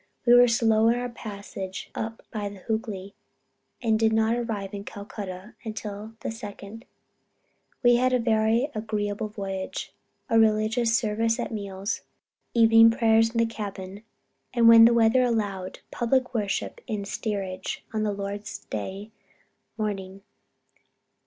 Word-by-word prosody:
We 240 - +6
were 245 0 +8
slow 225 -1 +3
in 230 - +4
our 245 0 -3
passage 200 -4 -7
up 225 0 -5
the 220 - -4 0.3
Hoogly, 205 -3 -3 0.7
and 220 -2 +2
did 225 -1 +3
not 220 +1 +2
arrive 215 -5 -3
in 200 -1 -5
Calcutta 200 -1 -8
until 215 -1 -6
the - - -3
2d 210 -3 -8
inst. 225 +4 -10 1.0
We 240 0 +6
had 255 +1 +2
a 255 - +4
very 230 +3 +2
agreeable 215 -1 -2
voyage, 195 -3 -5 0.3
religious 225 +1 +3
service 225 +1 0
at 240 - -3
meals, 200 -1 -4 0.5
evening 225 0 +7
prayers 225 -1 +3
in 230 - -6
the 230 - +4
cabin, 200 -3 -6 0.5
and 235 -1 +5
when 230 0 +10
the 235 - +6
weather 230 +2 +4
allowed, 205 -6 -1
public 250 +1 0
worship 210 -4 -2
in 215 -4 -2
the - - -6
steerage 195 -3 -4
on 215 -1 0
Lord's 205 0 -4
day 195 - -6 0.7
morning 195 -3 -4
220 Hz, 135 wpm, -26 LUFS, 200-230 Hz, 1.0 s, when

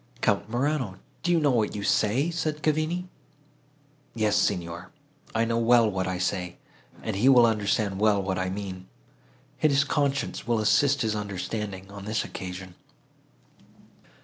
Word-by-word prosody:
"Count - - +1
Morano! 125 -4 -1 0.2
do 175 - 0
you 170 - +4
know 145 -3 +3
what 110 -5 +1
you 100 - -4
say?" 125 +12 +2
said 155 -2 -3
Cavigni. 155 +4 0 1.1
"Yes, 110 -2 +1
Signor, 85 -4 -1 0.5
I 115 +1 +2
know 115 0 0
well 115 0 +5
what 95 -3 -1
I 95 0 -2
say, 90 -1 -2 0.5
and - - -2
he 115 +7 +4
will 125 -3 +7
understand 105 -2 0
well 105 -1 +3
what 95 -1 -2
I 95 0 -1
mean. 95 -1 -6 0.7
His 140 -2 +4
conscience 140 -3 -1
will 120 -1 +2
assist 135 +6 +3
his 110 -1 0
understanding, 100 -1 -4
on 100 -1 -9
this 110 +1 -1
occasion." 90 0 -7
105 Hz, 150 wpm, -26 LUFS, 95-135 Hz, 1.1 s, will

